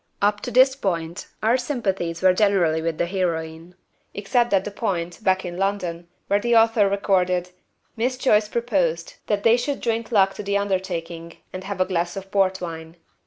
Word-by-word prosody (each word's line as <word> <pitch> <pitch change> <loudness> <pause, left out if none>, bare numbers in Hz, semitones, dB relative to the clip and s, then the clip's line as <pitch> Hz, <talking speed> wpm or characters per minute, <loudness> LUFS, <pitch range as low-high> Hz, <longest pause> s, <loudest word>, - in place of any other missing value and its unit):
Up 205 0 +1
to - - -4
this 260 +2 +5
point 170 -8 -3 0.2
our 230 +3 +4
sympathies 195 - -3
were 185 -1 +6
generally 180 -5 +2
with 165 -1 -2
the 175 - +1
heroine, 170 -2 -3 0.4
except 240 +4 +1
at 195 -1 +2
the 210 - -4
point, 180 -3 -3
back 190 -1 +2
in 175 0 -6
London, 180 -3 -2 0.2
where 200 - +2
the 235 +2 +1
author 225 -3 +4
recorded, 185 -3 0 0.4
"Miss 250 +3 -1
Joyce 215 -5 +3
proposed 190 -9 -1
that 205 -1 0
they 230 +1 +5
should 275 +3 -2
'drink 230 0 -2
luck' 195 -3 +4
to - - -7
the 200 0 0
undertaking 175 -4 -3 0.2
and 185 0 -7
have 200 -1 -5
'a 185 - +3
glass 175 0 -2
of 195 0 -8
port 190 -2 +2
wine.' 165 -1 -7
195 Hz, 180 wpm, -23 LUFS, 175-215 Hz, 0.4 s, were